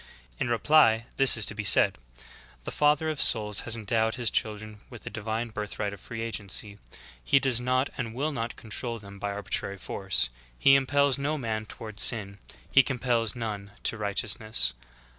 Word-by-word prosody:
In - - -1
reply 115 -2 +4
this 135 -3 +6
is 110 - 0
to - - -3
be 105 0 -5
said: 95 - +5 0.7
The - - -5
Father 150 +1 +2
of 150 - -3
souls 105 -3 +2
has 115 - +4
endowed 110 0 0
His 120 -2 0
children 110 0 -3
with 120 -3 -11
the - - -7
divine 110 +2 -3
birth 105 -1 -6
right 105 -1 -2
of 100 - -10
free 115 +4 -7
agency; 105 -2 -5 0.4
He 140 - +4
does 130 -3 +2
not 130 +2 0
and 115 -2 -3
v/ill 145 +6 -2
not 115 -4 -4
control 115 +2 -4
them 100 -2 -12
by 100 - -3
arbitrary 100 -1 -3
force; - - 0 0.3
He 135 - +5
impels 140 0 +3
no 150 +3 -1
man 110 -4 -3
tov/ard 110 -1 -9
sin; 100 -3 +3 0.3
He 135 - +7
compels 125 -4 -1
none 105 -4 -5
to - - 0
righteous 105 +1 -1
ness. 65 - +2
115 Hz, 180 wpm, -27 LUFS, 105-125 Hz, 0.7 s, He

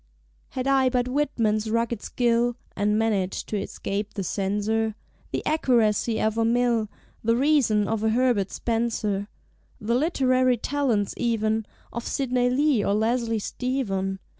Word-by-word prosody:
Had 255 - -1
I 270 -1 +3
but 250 -1 0
Whitman's 230 -6 0
rugged 230 -1 0
skill, 240 0 +1 0.2
(And 210 +1 +1
managed 205 -4 0
to 210 -2 -1
escape 205 +2 -4
the 195 - -2
Censor), 210 +4 -1 0.4
The - - -3
Accuracy 235 -6 +2
of 220 +1 0
a - - +3
Mill, 235 -2 +2 0.3
The 230 +1 +3
Reason 250 -6 +3
of 220 -1 -1
a 220 - +3
Herbert 230 -4 +2
Spencer, 220 -4 -1 0.5
The 220 +3 -1
literary 255 -3 +2
talents 240 -6 0
even 220 -2 0 0.3
Of 235 - -4
Sidney 250 -2 +1
Lee 270 -3 +2
or 200 - +1
Leslie 230 +1 +1
Stephen. 200 -5 -2
230 Hz, 140 wpm, -25 LUFS, 210-250 Hz, 0.5 s, I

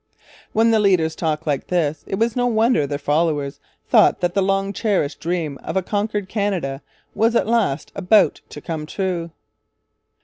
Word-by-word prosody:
When 225 +1 +3
the 220 - +4
leaders 180 -6 +2
talked 160 -1 -2
like 145 -3 -1
this, 155 -4 -1
it - - -2
was 230 +1 0
no 245 -1 +1
wonder 225 - +2
their 145 0 -3
followers 145 -2 0 0.3
thought - - +4
that 175 0 0
the 195 - +2
long 195 +1 0
cherished 195 -10 -1
dream 165 -4 -3
of - - -3
a 190 - +1
conquered 205 0 -2
Canada 185 -10 -2 0.3
was 230 +2 +2
at - - +3
last 215 -11 0
about 200 +1 +3
to - - -9
come 155 -3 -5
true. 180 -2 -3
185 Hz, 170 wpm, -21 LUFS, 155-210 Hz, 0.3 s, the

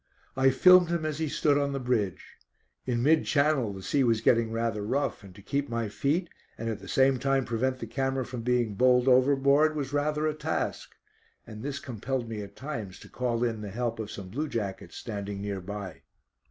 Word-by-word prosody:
I 135 0 +4
filmed 180 +6 +6
him 170 -2 -1
as 155 -1 -3
he 160 -2 -1
stood 145 0 +2
on 140 -1 -1
the 135 - -2
bridge. 115 -8 -2 0.5
In 120 -1 0
mid 155 +3 +4
channel 140 -6 +2
the 95 -1 -8
sea 140 +6 +1
was 115 -3 +2
getting 115 -1 +3
rather 115 -2 -1
rough, 130 0 -1
and 95 -2 -13
to 100 - -14
keep 140 +4 -2
my 115 -2 -2
feet, 145 - 0 0.3
and 115 - -5
at 110 -2 -3
the 100 - -12
same 130 -1 +3
time 135 0 +1
prevent 130 +3 -1
the 120 - -6
camera 135 +2 -1
from 125 -1 -6
being 120 -2 +1
bowled 125 +3 +4
overboard, 140 +4 +4
was 145 -2 -3
rather 150 +1 0
a 155 - +1
task, 155 - -3 0.5
and 110 -2 -9
this 140 +2 -4
compelled 125 0 -4
me 110 -2 -5
at 100 - -10
times 115 -10 -6
to - - -13
call 120 -2 -1
in 115 -3 -1
the 105 - -6
help 115 +2 -3
of 110 -2 -4
some 95 -4 -8
blue 145 +10 -3
jackets 100 - -4
standing 100 -3 -5
near 100 -1 -4
by. 100 0 -7
125 Hz, 205 wpm, -28 LUFS, 110-140 Hz, 0.5 s, filmed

